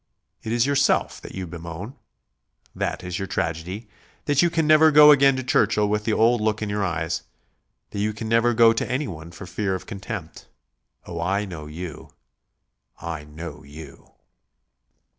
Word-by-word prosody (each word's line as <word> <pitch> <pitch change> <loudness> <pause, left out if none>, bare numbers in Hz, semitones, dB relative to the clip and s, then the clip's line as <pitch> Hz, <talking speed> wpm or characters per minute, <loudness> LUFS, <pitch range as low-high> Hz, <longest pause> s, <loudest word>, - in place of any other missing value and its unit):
It 110 - -5
is 120 +1 +2
yourself 140 0 +1
that - - -10
you 95 -1 -4
bemoan. 85 +6 -8 0.8
That - - -3
is 90 -1 -4
your 95 - -3
tragedy, 90 +8 -3 0.4
that 145 -2 +3
you 175 - +4
can 165 -1 0
never 155 +1 +6
go 150 0 +8
again 140 -2 +5
to 130 - -3
Churchill 105 -4 +2
with 105 0 -1
the 110 - +1
old 115 +1 +3
look 110 0 0
in 105 - -3
your 105 0 -1
eyes, 85 -2 -2 0.7
that 100 - -5
you 105 +1 0
can 110 +1 -6
never 115 +1 +3
go 115 0 +6
to 115 - -2
anyone 95 - -4
for 90 - -10
fear 95 +1 -2
of 95 - -7
contempt.... 100 -4 -7 0.6
Oh, 85 -1 -5
I 100 +4 0
know 80 -6 -8
you, 80 0 -8 0.9
I 80 -3 -6
know 75 0 -9
you." 75 0 -13
105 Hz, 170 wpm, -24 LUFS, 85-120 Hz, 0.9 s, go